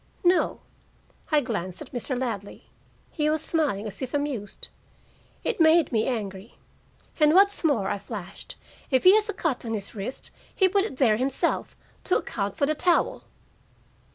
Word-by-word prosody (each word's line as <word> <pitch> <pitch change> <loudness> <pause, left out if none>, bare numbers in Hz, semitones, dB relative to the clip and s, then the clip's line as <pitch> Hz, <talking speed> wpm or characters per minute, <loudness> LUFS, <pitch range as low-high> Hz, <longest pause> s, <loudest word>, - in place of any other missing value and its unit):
"No." 355 0 +2 0.7
I 300 -1 +4
glanced 195 -8 -4
at - - -10
Mr. 245 +1 -3
Ladley: 210 -6 -4 0.5
he 300 -2 0
was 310 0 0
smiling, 285 -11 0
as 210 - -7
if 260 +1 -3
amused. 275 -9 -3 0.7
It - - -1
made 320 -1 +5
me 220 -2 +1
angry. 205 -4 -4 0.6
"And 300 +1 +5
what's 400 0 +4
more," 260 -12 +2
I 200 - -2
flashed, 200 -4 -8 0.3
"if 260 -2 +2
he 370 - +8
has 430 0 +3
a - - -1
cut 325 -8 -2
on 225 -1 -2
his 200 -2 -5
wrist, 215 +4 -5 0.2
he 380 - +4
put 390 +1 +2
it 270 - -7
there 230 -6 +4
himself, 260 +2 -1 0.3
to 365 - +3
account 200 -2 -4
for 280 - +2
the 305 - +1
towel." 345 +3 +1
260 Hz, 165 wpm, -26 LUFS, 215-320 Hz, 0.7 s, he